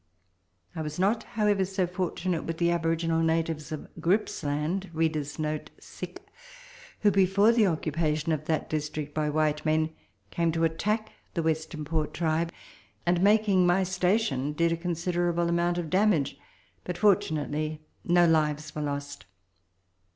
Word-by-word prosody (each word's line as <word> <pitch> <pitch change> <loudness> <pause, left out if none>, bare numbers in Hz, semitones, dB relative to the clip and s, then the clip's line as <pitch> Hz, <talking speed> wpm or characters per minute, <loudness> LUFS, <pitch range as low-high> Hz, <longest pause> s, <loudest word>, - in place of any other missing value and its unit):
I 160 - -3
was 150 -1 -5
not, 205 +5 +2 0.2
however, 205 -2 +3
so 190 0 0
fortunate 180 -1 -2
with 165 0 -3
the 170 0 +2
aboriginal 165 -1 +1
natives 160 -1 0
of 155 - -5
Grippsland, 165 -1 0 2.1
who, 210 - +4
before 195 +3 +4
the 230 -3 +4
occupation 155 -1 0
of 155 -1 -1
that 160 -1 -1
district 150 -1 -3
by 155 -1 0
white 150 0 +1
men, 155 0 +1 0.4
came 170 -1 +1
to 165 0 0
attack 210 +7 0 0.2
the 170 - 0
Western 160 -1 -2
Port 155 0 -2
tribe, 165 0 0 0.5
and, 175 0 +2
making 200 -2 +4
my 180 +2 +3
station, 180 - 0
did 170 +2 +2
a - - +2
considerable 175 0 -1
amount 170 +1 +1
of 170 -3 -3
damage; 185 -7 +2 0.5
but 180 - -4
fortunately, 155 -5 +1 0.2
no 175 0 +4
lives 150 -2 +1
Avere 150 0 -4
lost. 140 -8 -5
165 Hz, 135 wpm, -28 LUFS, 155-180 Hz, 2.1 s, who